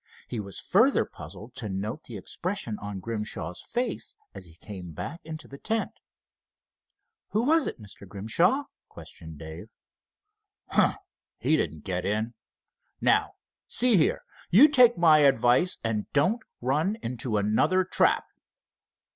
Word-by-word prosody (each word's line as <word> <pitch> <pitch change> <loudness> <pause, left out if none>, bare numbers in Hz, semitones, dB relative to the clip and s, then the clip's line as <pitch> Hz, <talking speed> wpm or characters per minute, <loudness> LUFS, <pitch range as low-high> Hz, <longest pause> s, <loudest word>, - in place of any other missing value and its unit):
He 120 - -4
was 100 -2 -6
further 230 +9 +3
puzzled 95 +9 -11
to 110 - -4
note 105 +10 -4
the 115 - -7
expression 145 - -4
on 100 -1 -6
Grimshaw's 105 -5 -5
face 245 +2 -3 0.2
as - - -8
he 80 -2 -15
came 90 -2 -9
back 170 - -6
into 155 0 -8
the 140 - -11
tent. 225 0 -1 1.4
"Who 215 +3 +2
was 315 +3 +3
it, - - -5
Mr. 100 -2 -13
Grimshaw?" 165 - +1 0.3
questioned 80 -1 -11
Dave. 80 +7 -9 1.0
"Humph! - - +3 0.4
he 160 - +2
didn't 80 - -2
get 90 -2 -2
in. 110 +3 -1 0.7
Now - - +2 0.3
see 245 -2 +3
here, 160 - +2 0.3
you 240 - +8
take 250 -6 +6
my 160 -3 +6
advice 135 +5 +4
and 110 -2 -2
don't 185 - +2 0.2
run 155 - 0
into 120 -2 -1
another 110 - +2
trap." 185 - +3
120 Hz, 135 wpm, -27 LUFS, -, 1.4 s, you